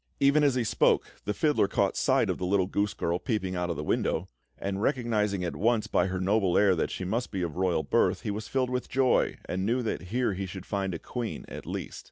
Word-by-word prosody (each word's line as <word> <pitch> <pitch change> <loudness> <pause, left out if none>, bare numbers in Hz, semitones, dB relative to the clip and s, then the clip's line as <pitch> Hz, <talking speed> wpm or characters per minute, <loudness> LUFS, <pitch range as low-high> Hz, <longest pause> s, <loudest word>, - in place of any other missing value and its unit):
Even 140 +2 +4
as 140 -3 +3
he 125 - +1
spoke, 110 - +3 0.2
the 105 - 0
fiddler 150 -4 +2
caught - - +1
sight - - +2
of - - -4
the - - -4
little 95 -1 +3
goose 100 +2 -1
girl 85 +1 -1
peeping 95 -5 -2
out 90 0 -1
of 85 - -1
the - - -4
window; 85 +4 0 0.3
and 100 0 -3
recognising 110 -7 0
at 90 - -3
once 115 +1 +2
by - - +1
her 95 0 -2
noble 95 -1 +2
air 100 -2 +5
that 80 - 0
she 95 - -4
must 115 +6 -1
be 95 -3 -3
of 85 -3 -3
royal 90 -3 +1
birth, - - +2
he - - -2
was 105 +1 -5
filled 130 +2 0
with 125 0 -2
joy, 130 -1 +2
and 95 +1 -2
knew 120 +5 +1
that 110 -4 -3
here 120 -1 +1
he 95 +1 -4
should 95 0 -8
find 95 -3 -2
a - - -2
queen, 120 +5 -5
at - - -9
least. - - -5
100 Hz, 245 wpm, -28 LUFS, 95-120 Hz, 0.3 s, air